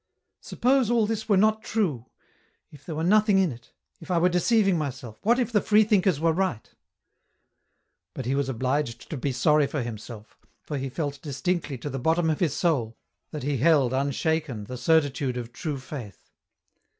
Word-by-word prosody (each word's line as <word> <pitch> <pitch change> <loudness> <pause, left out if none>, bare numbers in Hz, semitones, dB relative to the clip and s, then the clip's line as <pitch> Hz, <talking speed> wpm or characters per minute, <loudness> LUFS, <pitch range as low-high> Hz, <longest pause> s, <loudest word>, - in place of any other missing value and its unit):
" - - -56
Suppose 255 -1 +2
all 235 -2 +3
this 220 +1 -3
were 200 - +4
not 215 +2 +3
true, 165 - -2 0.6
if 145 -2 -15
there 160 +1 -6
were 160 - -2
nothing 210 +2 +4
in 190 -5 +2
it, 120 -1 -13 0.3
if 165 - -13
I 180 - +2
were 175 +2 +4
deceiving 195 +2 +2
myself, 130 -8 -5
what 235 +3 +3
if 245 -2 -1
the 210 -3 +3
freethinkers 205 - +3
were 165 0 +2
right? 170 - -1 0.8
" - - -51
But 130 - -5
he 130 - 0
was 140 -1 0
obliged 130 0 -2
to - - -2
be 135 +2 -2
sorry 150 +3 +3
for 145 -3 -3
himself, 110 -1 -9 0.2
for 145 -2 -4
he 135 0 -3
felt 145 0 -4
distinctly 150 0 -2
to 135 +5 -6
the 135 - -4
bottom 160 +4 +2
of 155 - -2
his 160 -6 0
soul, 130 -10 0 0.3
that 150 - -6
he 145 0 -1
held 140 -2 +3
unshaken 140 -2 -1
the 125 +5 -7
certitude 140 -3 +1
of 120 -1 -6
true 155 -5 -4
Faith. 130 - -9
150 Hz, 185 wpm, -26 LUFS, 130-185 Hz, 0.8 s, were